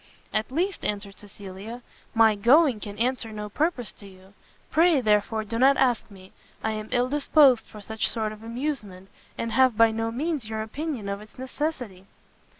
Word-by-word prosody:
"At 215 +3 -1
least," 360 +7 -1
answered 200 -1 -4
Cecilia, 205 +3 -9 0.3
"my 225 -1 +6
going 245 +4 +4
can 205 0 -7
answer 240 0 -1
no 210 -1 -6
purpose 290 -1 -1
to 200 - -14
you: 190 0 -17 0.4
pray, 330 -2 +4
therefore, 220 -1 +1
do 230 +2 -4
not 270 +2 +5
ask 245 -5 +1
me; 190 -2 -15 0.3
I 220 - 0
am 215 0 -5
ill 245 +1 +2
disposed 280 -3 +4
for 210 - -11
such 220 +2 -2
sort 220 -2 -2
of 215 0 -11
amusement, 225 -6 -5 0.3
and 230 - -3
have 255 -1 +4
by 230 0 +6
no 225 +1 -2
means 275 -1 -3
your 220 0 -3
opinion 270 -1 -5
of 200 +1 -4
its 215 - -16
necessity." 255 - -4
225 Hz, 175 wpm, -26 LUFS, 210-260 Hz, 0.4 s, my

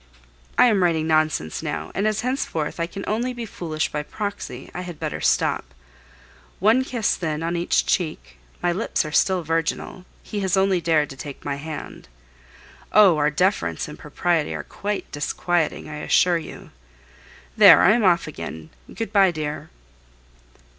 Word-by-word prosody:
I - - +7
am 215 -6 +3
writing 165 -3 +2
nonsense 155 - +1
now, - - -4
and 200 +2 0
as 215 0 0
henceforth 235 - -2
I 170 - 0
can 195 +2 -7
only 240 +4 -1
be 240 -1 -5
foolish 160 -6 -3
by 150 - -2
proxy, 205 +6 -6
I 180 - -4
had 175 -4 -8
better - - -4
stop. - - 0 0.8
One 220 +7 +4
kiss, 240 -4 0
then, 155 -2 -3
on 170 +1 -1
each 170 0 +1
cheek 160 -4 -2 0.3
my 175 - +2
lips 185 -2 -1
are 155 - -5
still 185 +3 +2
virginal, 165 +3 -2 0.2
he 210 - -5
has 190 -2 0
only 190 -2 +2
dared 155 -3 +1
to - - -8
take 140 +1 -9
my 140 -1 -2
hand. 150 - -8 0.8
Oh! 195 -6 +6
our 150 0 +3
deference 150 - 0
and - - -10
propriety 170 -4 -1
are - - -5
quite 205 0 -5
disquieting, 165 +3 -1
I 150 0 -7
assure 170 +3 +3
you. 155 - -11 0.8
There, - - +8
I 195 - +7
am 230 +1 +2
off 175 -3 +4
again.... 80 - -8 0.2
Good 225 -1 -5
bye, 195 -2 +6
dear. 155 -3 -4
175 Hz, 165 wpm, -23 LUFS, 155-200 Hz, 0.8 s, There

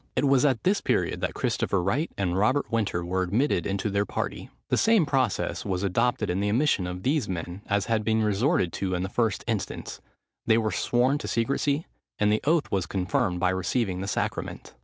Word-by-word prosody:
It - - +2
was 135 -2 +4
at 130 -5 +1
this 200 +2 +2
period - - 0
that - - -2
Christopher 95 -3 0
Wright 130 - 0
and 90 -3 0
Robert 120 +9 +1
Winter 105 -6 0
were 95 +2 -1
admitted 100 - +1
into 100 +1 -1
their 100 +1 +2
party. 105 - -4 0.2
The - - +2
same 220 -6 +4
process 130 -7 0
was 95 -2 -2
adopted 110 +3 +1
in 90 +1 -1
the 100 +1 0
admission 115 -5 +2
of 90 +1 -6
these 140 -2 +1
men 90 +1 -5
as 100 -2 +1
had 115 -2 0
been 110 0 +1
resorted 105 - +1
to 95 -2 -2
in 90 - -1
the 95 - -3
first 110 -1 0
instance: 110 -6 -4 0.5
they 110 -1 +5
were 110 -2 0
sworn 130 +4 +1
to - - -6
secresy, 140 +6 0 0.3
and 105 0 +2
the 105 - +1
oath 155 0 +2
was 95 -3 0
confirmed 90 -1 0
by 90 0 +2
receiving 95 0 -1
the 95 - -4
sacrament. - - -3
105 Hz, 200 wpm, -26 LUFS, 95-130 Hz, 0.5 s, they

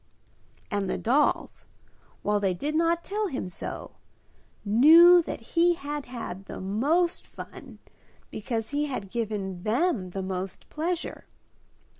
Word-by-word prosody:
And 200 -2 -1
the - - -1
dolls, 270 +6 +1 0.6
while 210 0 +1
they 195 -3 0
did 295 +11 -3
not 335 +1 +2
tell 420 +1 -2
him 265 - -4
so, 180 - -7 0.7
knew 325 - +8
that 320 - -6
he 345 +1 +4
had 295 -2 -5
had 225 -6 -7
the - - -7
most 285 - 0
fun - - -11 0.5
because 225 +1 -3
he 295 +1 0
had 200 -9 -5
given 205 -6 -3
them 225 - 0
the 190 +1 -4
most 190 0 -5
pleasure. 340 +3 -3
245 Hz, 130 wpm, -27 LUFS, 200-330 Hz, 0.7 s, knew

